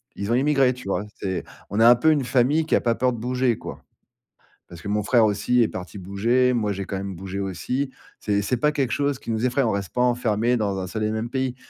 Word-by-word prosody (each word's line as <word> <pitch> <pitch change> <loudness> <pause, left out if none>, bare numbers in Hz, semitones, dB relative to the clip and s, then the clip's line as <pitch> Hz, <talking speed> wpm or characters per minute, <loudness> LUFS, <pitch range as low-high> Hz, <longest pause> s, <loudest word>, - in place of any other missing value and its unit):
Ils 100 +3 -3
ont - - +3
émigré, 135 -1 +3
tu 125 -5 -11
vois? 100 +1 -1 0.2
C'est 95 -3 -2 0.3
on 100 - -2
a 115 - +7
un 120 - +8
peu 160 +7 +3
une 145 -3 +1
famille 135 +6 +2
qui 160 - +2
a - - +2
pas 115 -1 +1
peur 125 +1 +1
de 120 - -6
bouger 125 0 0
quoi. - - -9 0.8
Parce 85 -1 -12
que 100 - -6
mon 105 +1 +1
frère 115 +2 +3
aussi 105 +4 +2
est 110 - +2
parti 95 +2 -7
bouger, 115 +7 +1
moi, 110 -4 0
j'ai 100 0 -4
quand 95 - -4
même 95 0 -5
bougé 95 +2 -6
aussi. 110 +8 -2 0.3
C'est 100 -1 0
c'est 125 +5 -1
pas 150 +5 +2
quelque 135 -5 -1
chose 140 -2 0
qui 115 - -5
nous 110 +2 0
effraie, 125 +2 +1
on 115 - +1
reste 100 -2 -4
pas 125 - 0
enfermé 120 -1 +1
dans 100 -3 -1
un 95 - -4
seul 110 +4 -4
et 105 - 0
même 110 +2 -3
pays 130 0 -2
115 Hz, 260 wpm, -23 LUFS, 100-125 Hz, 0.8 s, un